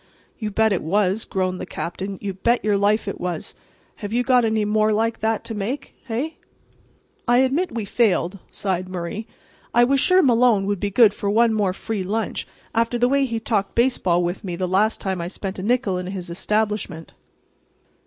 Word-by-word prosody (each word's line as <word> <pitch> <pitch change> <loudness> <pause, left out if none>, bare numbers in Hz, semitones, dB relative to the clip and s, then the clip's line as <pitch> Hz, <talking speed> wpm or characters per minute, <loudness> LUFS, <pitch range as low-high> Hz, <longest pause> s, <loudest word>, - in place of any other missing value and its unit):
"You 215 -2 -2
bet 220 +1 +2
it 180 - -1
was," 195 +5 +1
groaned 185 -1 -2
the - - -4
Captain, 190 +3 -5
"you 200 -2 -3
bet 235 +5 +1
your 210 -1 +3
life 205 +2 +2
it 200 - -4
was. 175 -3 -4 0.4
Have 205 -2 -6
you 245 +2 +1
got 250 -1 +4
any 220 -1 +1
more 215 +1 +2
like 225 +2 0
that 220 0 0
to 225 - -5
make—hey?" 250 +5 -4 0.9
"I 240 +1 +5
admit 265 +4 +1
we 225 -3 -2
failed," 200 -4 +1
sighed 185 -2 -2
Murray. 185 +5 -5 0.5
"I 240 - +7
was 270 +3 +3
sure 365 +6 +5
Malone 235 -6 +4
would 200 -1 -1
be 205 - -1
good 205 0 +5
for 205 - -3
one 225 +2 +4
more 205 -3 +1
free 210 +2 -4
lunch 215 +4 -2 0.3
after 230 +1 +1
the 245 +1 +3
way 275 0 +3
he 230 -3 -2
talked 215 -3 -1
baseball 190 -8 +2
with 175 +4 -3
me 180 -3 -4
the 185 +1 -2
last 205 +5 +2
time 190 -3 -2
I 170 - -3
spent 195 +1 -5
a - - -3
nickel 210 -3 +1
in 180 - -5
his 185 -2 -6
establishment." 210 -3 -2
210 Hz, 195 wpm, -22 LUFS, 190-230 Hz, 0.9 s, I